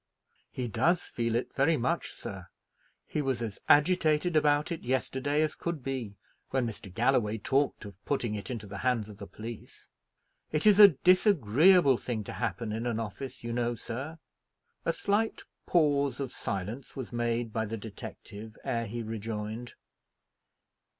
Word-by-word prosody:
"He 125 -2 -4
does 155 - +2
feel 115 -1 -2
it 120 - -2
very 155 +4 +3
much, 160 +8 -1
sir. 95 -3 -8 0.6
He 150 - -2
was 135 -4 -1
as 110 -4 -4
agitated 155 +1 +4
about 150 0 +3
it 165 - -3
yesterday 130 +4 0
as 155 - 0
could 170 -6 -4
be, 120 -7 -4 0.3
when 130 -2 +1
Mr. 105 -4 -7
Galloway 115 0 +2
talked 135 +2 0
of 100 -1 -12
putting 120 -6 -1
it 105 +3 -5
into 115 -4 -4
the 100 -1 -7
hands 115 -3 0
of 105 - -12
the - - -7
police. 115 0 -9 0.6
It 155 +3 0
is 210 -1 +6
a 205 - +13 0.2
disagreeable 175 - +5
thing 115 -4 -3
to - - -7
happen 115 -3 -2
in 115 +3 -2
an 115 -2 -1
office, 115 +4 -6
you 115 0 -3
know, 120 0 0
sir." 135 +8 -6 0.7
A 165 - +2
slight 210 +5 0 0.2
pause 145 -5 +2
of 135 -3 -3
silence 100 +7 -5
was 130 -3 -6
made 120 -1 -1
by 110 0 0
the 110 +2 -4
detective 110 0 -9
ere 115 -4 -1
he 120 +3 -4
rejoined. 110 +1 -5
120 Hz, 160 wpm, -30 LUFS, 110-145 Hz, 0.7 s, a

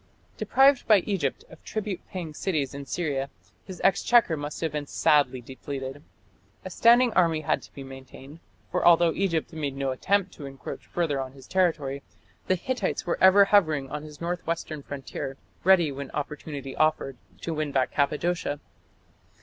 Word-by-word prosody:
Deprived 270 0 +4
by 210 -4 +6
Egypt 175 -9 -2
of 160 - -15
tribute 205 -4 -4
paying 170 -5 -6
cities 150 -6 -1
in 140 0 -7
Syria, 140 -2 -2 0.4
his 185 - -9
exchequer 195 0 +4
must 145 0 -5
have 160 -2 -1
been 150 -1 -4
sadly 145 -4 +2
depleted. 135 +2 -7 0.6
A - - -6
standing 240 0 +5
army 165 -3 +3
had 155 - 0
to - - -16
be 140 - -7
maintained, 135 +3 -12 0.3
for - - 0
although 170 -1 +6
Egypt 170 -6 -1
made 145 -4 -3
no 135 -1 -1
attempt 195 +8 0
to 145 - -8
encroach 135 0 -8
further 150 -6 -1
on 130 0 -6
his 135 -1 -14
territory, 160 -7 0 0.5
the 185 - +3
Hittites 210 +2 -2
were 175 - -1
ever 190 +2 +8
hovering 155 -10 +2
on 150 0 -4
his 150 -1 -11
north 175 0 -4
western 165 -2 -3
frontier, 135 -1 -6 0.3
ready 175 -5 +5
when 140 0 -6
opportunity 145 -2 -5
offered 155 -3 +1 0.3
to 165 - -3
win 155 -2 -2
back 135 -2 +1
Cappadocia. 150 +1 0
155 Hz, 165 wpm, -26 LUFS, 140-180 Hz, 0.6 s, ever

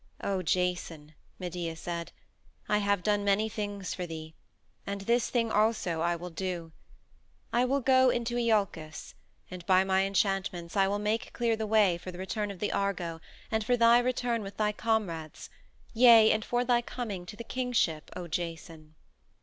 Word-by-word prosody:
"O 195 -2 0
Jason," 175 -3 -2 0.2
Medea 175 -2 -4
said, 170 0 -5 0.6
"I 210 - +2
have 200 -2 +1
done 205 -1 +1
many 200 +2 +2
things 205 -3 -4
for 180 -1 -5
thee 160 -1 -8 0.5
and 200 0 -4
this 235 +4 +1
thing 230 -2 0
also 210 -7 +1
I 170 +1 +1
will 175 +1 -7
do. 175 -2 -4 0.8
I 240 +2 +3
will 275 +2 +1
go 260 0 +5
into 240 0 -1
Iolcus, 200 -9 -1 0.4
and 180 -1 -7
by 185 0 +5
my 190 0 +2
enchantments 195 -3 -1
I 195 -1 +4
will 200 +1 0
make 210 +2 -2
clear 235 -1 +1
the 220 -1 -3
way 205 -5 +3
for 185 - -7
the 175 - -10
return 205 +3 -3
of 200 - -7
the 210 - -2
Argo 175 -5 -2 0.3
and 220 -1 +1
for 245 +3 +2
thy 235 +1 +6
return 245 -2 0
with 195 -1 -8
thy 210 -1 +1
comrades 200 -9 -2 0.4
yea, 230 -2 +7
and 215 0 +1
for 245 +2 0
thy 240 -1 +3
coming 210 -7 -6
to 210 - -8
the 235 - -7
kingship, 235 -12 -1
O 180 -1 -6
Jason." 165 -2 -6
200 Hz, 175 wpm, -29 LUFS, 175-225 Hz, 0.8 s, yea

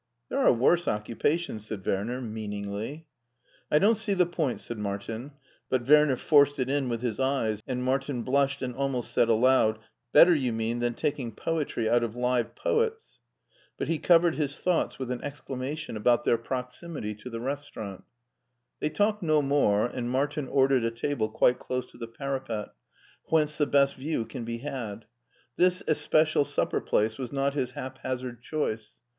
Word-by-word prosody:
"There 270 - -1
are 270 - +6
worse 170 +9 +3
occupations," 110 +2 -1
said 100 -4 -6
Werner, 115 +7 -1
meaningly. 110 +5 -5 0.3
" - - -35
I 150 - +5
don't 210 +7 +4
see 205 -3 0
the 180 -1 +4
point," 160 -6 -2
said 120 -2 -6
Martin, 110 +6 -4 0.4
but 130 -1 0
Werner 150 -2 +6
forced 145 +1 +4
it 130 0 -1
in 140 -3 0
with 115 0 -3
his 120 -2 -2
eyes, 130 -6 0
and 125 -1 -2
Martin 130 -1 -1
blushed 135 +1 +1
and 125 -1 -3
almost 135 -2 -2
said 115 - +3
aloud, 115 -1 +4 0.3
"Better, 175 +1 +8
you 130 -7 0
mean, 115 +1 -1
than 120 -1 -1
taking 135 -4 -2
poetry 150 -8 -1
out 120 +1 +3
of 115 -1 -3
live 125 -1 0
poets," 460 -2 -1 0.6
but - - -3
he 165 -2 0
covered 170 -1 +5
his 145 -2 -2
thoughts 180 -2 0
with 130 -2 -4
an 125 - -4
exclamation 145 0 -5
about 120 +3 +2
their - - +3
proximity 125 0 -5
to 105 +4 -10
the 115 - -5
HEIDELBERG 115 - -6
25 - - -5
restaurant 135 -9 -5 0.8
They 150 - 0
talked 205 +6 +1
no 155 -3 +2
more, 135 -7 +3
and 120 0 -3
Martin 140 +2 -1
ordered 135 -2 +3
a 115 - +2
table 115 -1 -2
quite 125 +3 +3
close 125 -1 -3
to - - -16
the 115 - -5
parapet, 130 -3 -4 0.6
whence 155 -1 +1
the 150 - +3
best 140 -1 +3
view 135 -3 -2
can 115 - -7
be 115 0 -3
had. 115 -5 -6 0.5
This 180 0 +3
especial 155 0 +3
supper - - 0
place 110 +3 0
was 125 -3 -4
not 140 0 0
his 135 -4 -1
haphazard 130 -2 -5
choice. 115 -6 -3
130 Hz, 175 wpm, -28 LUFS, 115-150 Hz, 0.8 s, Better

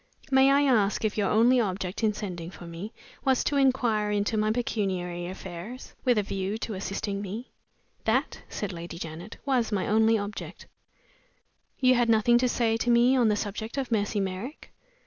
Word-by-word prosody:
"May 265 0 +6
I 280 +1 +4
ask 220 -6 +2
if 210 - 0
your 205 -3 +1
only 240 +4 +5
object 190 -1 -2
in 215 - +4
sending 180 -5 -6
for 175 0 -11
me 170 +6 -7 0.3
was 265 -2 +2
to 290 - 0
inquire 245 -6 +2
into 205 +1 0
my 215 0 +1
pecuniary 185 -7 -2
affairs, 190 +6 -8
with 245 -3 +3
a 210 - +2
view 195 +1 -3
to 225 -1 -4
assisting 200 +1 -3
me?" 210 +5 -6 0.5
"That," - - 0
said 200 -3 -4
Lady 170 0 -7
Janet, 170 +5 -7
"was 250 -5 +1
my 195 -3 0
only 220 +1 +4
object." 205 0 -6 1.1
"You 255 -1 +5
had 240 -2 +2
nothing 230 +2 +5
to 250 0 +2
say 225 -2 +1
to 240 - -1
me 240 +2 +5
on 245 -3 +4
the 210 - +3
subject 215 +4 -4
of 265 -3 -2
Mercy 205 -1 +1
Merrick?" 195 +9 -5
215 Hz, 180 wpm, -27 LUFS, 195-240 Hz, 1.1 s, May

